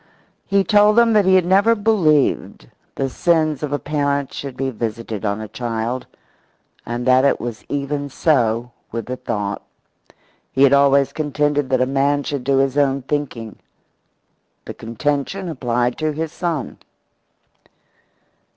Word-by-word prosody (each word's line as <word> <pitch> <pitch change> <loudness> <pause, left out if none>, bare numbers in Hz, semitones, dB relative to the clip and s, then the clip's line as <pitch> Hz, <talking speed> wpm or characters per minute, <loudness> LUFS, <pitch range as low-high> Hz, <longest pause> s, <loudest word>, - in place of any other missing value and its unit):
He 200 0 +3
told 210 +1 +4
them 235 -1 +5
that 210 -2 +4
he 190 0 +5
had 185 -2 +4
never 200 +5 +4
believed 190 - +1 0.3
the 135 - -1
sins 155 0 +1
of 150 -2 -3
a 145 - +1
parent 145 -2 -1
should 135 -3 -7
be 135 0 -1
visited 115 -2 -5
on 100 0 -1
a 110 - -6
child, 120 +2 -4 0.8
and 120 +1 -3
that 130 0 +5
it 140 - +2
was 120 -2 -6
even 145 0 -3
so 120 -5 +1 0.2
with 115 -1 -4
the 125 - -4
thought. 105 -5 -3 0.9
He 135 - +2
had 140 0 +6
always 140 -1 +4
contended 145 -2 0
that 130 -1 +2
a - - +4
man 140 +2 +1
should 140 -3 -4
do 135 +1 +1
his 135 +1 +1
own 135 -1 +1
thinking. 130 -6 -4 1.1
The - - -6
contention 145 - -3
applied 125 -5 -1
to 155 -1 0
his 160 +1 -3
son. 165 -7 -4
140 Hz, 150 wpm, -20 LUFS, 125-155 Hz, 1.1 s, had